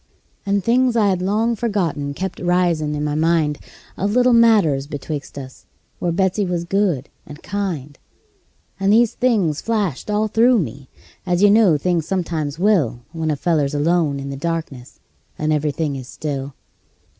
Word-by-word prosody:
And 200 Hz, -1 st, +1 dB
things 245 Hz, +3 st, +2 dB
I 210 Hz, -3 st, +3 dB
had 185 Hz, -2 st, 0 dB
long 220 Hz, +5 st, +1 dB
forgotten 175 Hz, -11 st, -2 dB
kept 190 Hz, +2 st, -4 dB
risin' 175 Hz, -4 st, +1 dB
in 150 Hz, -, -3 dB
my 150 Hz, -1 st, -1 dB
mind, 155 Hz, -1 st, +1 dB, 0.4 s
Of 200 Hz, +2 st, -1 dB
little 250 Hz, 0 st, +4 dB
matters 205 Hz, -13 st, +4 dB
betwixt 145 Hz, 0 st, -6 dB
us, 130 Hz, -1 st, -10 dB, 0.3 s
where 175 Hz, -, -1 dB
Betsey 190 Hz, +3 st, +1 dB
was 175 Hz, -2 st, -2 dB
good 175 Hz, -7 st, 0 dB, 0.2 s
and 150 Hz, +1 st, -11 dB
kind; 170 Hz, -8 st, -4 dB, 0.8 s
And 195 Hz, +1 st, +2 dB
these 230 Hz, +1 st, +4 dB
things 205 Hz, -, +1 dB
flashed 210 Hz, -, -2 dB
all 210 Hz, +1 st, +1 dB
through 235 Hz, +3 st, +4 dB
me, 140 Hz, -, -4 dB, 0.3 s
as 180 Hz, 0 st, 0 dB
you 205 Hz, -, +7 dB
know 205 Hz, -7 st, +5 dB
things 170 Hz, +1 st, -1 dB
sometimes 160 Hz, -6 st, -2 dB
will 170 Hz, -, +1 dB
When 160 Hz, -1 st, -3 dB
a 150 Hz, -, +1 dB
feller's 150 Hz, -2 st, 0 dB
alone 150 Hz, -1 st, +1 dB
in 140 Hz, 0 st, -5 dB
the 135 Hz, -, -6 dB
darkness, 145 Hz, -5 st, -5 dB, 0.4 s
and 155 Hz, 0 st, 0 dB
every 150 Hz, 0 st, 0 dB
thing 150 Hz, -1 st, -2 dB
is 130 Hz, -2 st, -7 dB
still. 140 Hz, -2 st, -5 dB
170 Hz, 165 wpm, -20 LUFS, 145-205 Hz, 0.8 s, you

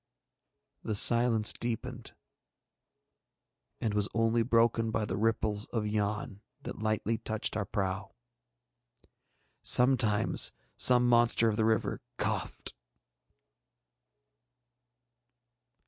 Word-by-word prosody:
The 110 Hz, -, -4 dB
silence 115 Hz, 0 st, +4 dB
deepened, 120 Hz, 0 st, -5 dB, 1.6 s
and 110 Hz, -, -2 dB
was 105 Hz, 0 st, -1 dB
only 115 Hz, 0 st, +1 dB
broken 115 Hz, -1 st, +1 dB
by 110 Hz, -1 st, -2 dB
the -, -, -4 dB
ripples 105 Hz, -1 st, -1 dB
of 110 Hz, -3 st, -3 dB
Yann 105 Hz, -1 st, -3 dB, 0.2 s
that -, -, -8 dB
lightly 110 Hz, 0 st, -2 dB
touched 110 Hz, -2 st, -4 dB
our 105 Hz, -2 st, -2 dB
prow. 95 Hz, 0 st, -4 dB, 1.5 s
Sometimes 125 Hz, -5 st, +3 dB, 0.2 s
some 125 Hz, -1 st, +5 dB
monster 120 Hz, -1 st, +3 dB
of 105 Hz, -, -2 dB
the 110 Hz, 0 st, 0 dB
river 110 Hz, -1 st, -1 dB, 0.2 s
coughed. -, -, -4 dB
110 Hz, 90 wpm, -29 LUFS, 105-115 Hz, 1.6 s, some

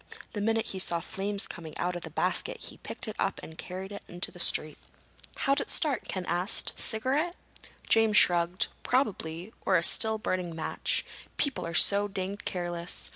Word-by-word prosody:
The 210 Hz, -, -3 dB
minute 225 Hz, +1 st, +1 dB
he 190 Hz, -, -3 dB
saw 170 Hz, -2 st, +2 dB
flames 200 Hz, +4 st, -1 dB
coming 160 Hz, -3 st, -8 dB
out 180 Hz, +1 st, -1 dB
of 175 Hz, -, -5 dB
the -, -, -7 dB
basket -, -, 0 dB
he -, -, -7 dB
picked -, -, -3 dB
it -, -, -5 dB
up -, -, 0 dB
and 160 Hz, -, -10 dB
carried 185 Hz, +3 st, -7 dB
it 200 Hz, -, -7 dB
into 175 Hz, +1 st, 0 dB
the 175 Hz, -, -13 dB
street." 155 Hz, -2 st, +1 dB, 0.6 s
"How'd 275 Hz, 0 st, +1 dB
it -, -, -4 dB
start?" 285 Hz, -8 st, +2 dB
Ken 185 Hz, -2 st, -4 dB
asked. 180 Hz, +4 st, +2 dB
"Cigarette?" 280 Hz, +10 st, +2 dB, 0.5 s
James 225 Hz, -2 st, +4 dB
shrugged. 175 Hz, +4 st, +4 dB, 0.2 s
"Probably. 195 Hz, -7 st, -1 dB
Or 185 Hz, -, +4 dB
a 165 Hz, -, 0 dB
still 220 Hz, +4 st, +4 dB
burning 180 Hz, -5 st, -2 dB
match. 160 Hz, -, -1 dB, 0.3 s
People 275 Hz, -, 0 dB
are 170 Hz, -, -5 dB
so 200 Hz, +3 st, +5 dB
danged 195 Hz, +1 st, -4 dB
careless. 175 Hz, -1 st, -3 dB
190 Hz, 180 wpm, -29 LUFS, 175-220 Hz, 0.6 s, so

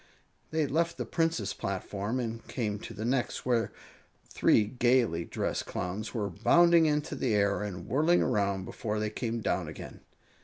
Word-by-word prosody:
They 160 Hz, -1 st, +1 dB
left 165 Hz, +4 st, 0 dB
the -, -, -3 dB
Prince's 165 Hz, -, 0 dB
platform 100 Hz, +4 st, -3 dB
and 115 Hz, -2 st, -4 dB
came 105 Hz, -5 st, -2 dB
to 115 Hz, -, -8 dB
the 110 Hz, +2 st, -4 dB
next, 125 Hz, 0 st, -1 dB
where 120 Hz, -4 st, +1 dB, 0.6 s
three 110 Hz, -, +3 dB
gaily 120 Hz, -7 st, +2 dB
dressed -, -, -3 dB
Clowns 95 Hz, +5 st, -4 dB
were 105 Hz, -5 st, -2 dB
bounding 170 Hz, -, +5 dB
into 150 Hz, -1 st, 0 dB
the 120 Hz, -5 st, 0 dB
air 100 Hz, 0 st, +2 dB
and 95 Hz, -4 st, -5 dB
whirling 155 Hz, +7 st, +3 dB
around 100 Hz, -2 st, 0 dB
before 105 Hz, +1 st, -3 dB
they 105 Hz, 0 st, -1 dB
came 115 Hz, 0 st, -3 dB
down -, -, -1 dB
again. -, -, -9 dB
115 Hz, 160 wpm, -30 LUFS, 105-135 Hz, 0.6 s, bounding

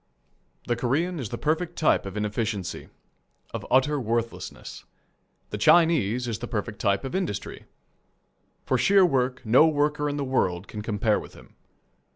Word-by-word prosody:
The 120 Hz, -, 0 dB
Korean 160 Hz, +9 st, -1 dB
is 120 Hz, -6 st, -4 dB
the -, -, -4 dB
perfect 165 Hz, +3 st, -1 dB
type 155 Hz, -, +2 dB
of 95 Hz, +2 st, -7 dB
inefficiency 105 Hz, -3 st, -3 dB, 0.6 s
of -, -, -4 dB
utter 140 Hz, +3 st, +3 dB
worthlessness. 115 Hz, -1 st, -4 dB, 0.7 s
The 105 Hz, -, -4 dB
Chinese 125 Hz, -, +4 dB
is 115 Hz, -3 st, -3 dB
the 120 Hz, -, -5 dB
perfect 105 Hz, -2 st, -4 dB
type 100 Hz, +3 st, +1 dB
of 135 Hz, -, -5 dB
industry. 180 Hz, -, -4 dB, 1.0 s
For -, -, +1 dB
sheer 195 Hz, -1 st, +5 dB
work 130 Hz, -5 st, 0 dB
no 125 Hz, +8 st, +6 dB
worker 150 Hz, -1 st, 0 dB
in 145 Hz, -, -3 dB
the 145 Hz, -, -1 dB
world 95 Hz, -9 st, 0 dB
can 105 Hz, -, -7 dB
compare 105 Hz, 0 st, 0 dB
with -, -, -11 dB
him. -, -, -17 dB
125 Hz, 155 wpm, -26 LUFS, 105-150 Hz, 1.0 s, no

